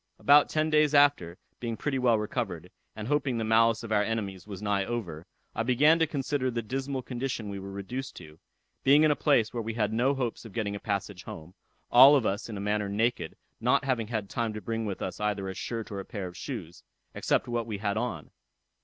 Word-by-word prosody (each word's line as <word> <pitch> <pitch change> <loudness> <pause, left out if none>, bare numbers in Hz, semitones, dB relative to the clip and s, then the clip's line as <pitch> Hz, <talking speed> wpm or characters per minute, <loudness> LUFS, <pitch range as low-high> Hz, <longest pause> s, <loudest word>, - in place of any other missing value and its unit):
About 145 +1 +5
ten 155 0 0
days 150 -1 +4
after, 140 -13 +4 0.2
being 115 -2 -4
pretty 140 -2 -1
well 120 -3 +3
recovered, 105 -5 -4 0.2
and 110 0 -6
hoping 140 -3 0
the 115 - -1
malice 115 +1 +3
of 115 - -7
our 105 -1 +3
enemies 105 -4 -3
was 100 -3 -7
nigh 100 -1 0
over, 90 -8 -5 0.3
I - - -2
began 140 +7 +4
to 160 - +3
consider 140 -2 -1
the 120 -1 -3
dismal 135 +3 -3
condition 120 -3 -4
we 100 - -5
were 95 0 -8
reduced 100 +7 -6
to; 80 -2 -12 0.4
being 145 +3 +6
in 155 - +5
a - - +2
place 135 -8 +2
where 120 - -2
we 115 0 -4
had 110 -2 0
no 130 +5 +2
hopes 125 -4 -3
of 115 -4 -11
getting 105 -3 -2
a - - -5
passage 100 -3 -3
home, 80 +3 -9 0.4
all 135 +4 +9
of 130 -6 +2
us 100 +4 -2
in 105 - -5
a - - -5
manner 105 0 -1
naked, 110 -4 -1 0.2
not - - +2
having 125 -5 0
had 110 -3 -3
time 115 +1 -2
to 105 - -5
bring 115 0 -3
with 100 - -4
us 95 - -5
either 105 -2 -1
a 95 - -4
shirt 115 +3 -5
or 100 - -4
a - - -5
pair 100 0 -6
of 90 -1 -8
shoes, 85 +2 -7 0.3
except - - 0
what 120 -1 -2
we 105 -3 -3
had 100 0 -1
on. - - -3
115 Hz, 225 wpm, -28 LUFS, 100-130 Hz, 0.4 s, all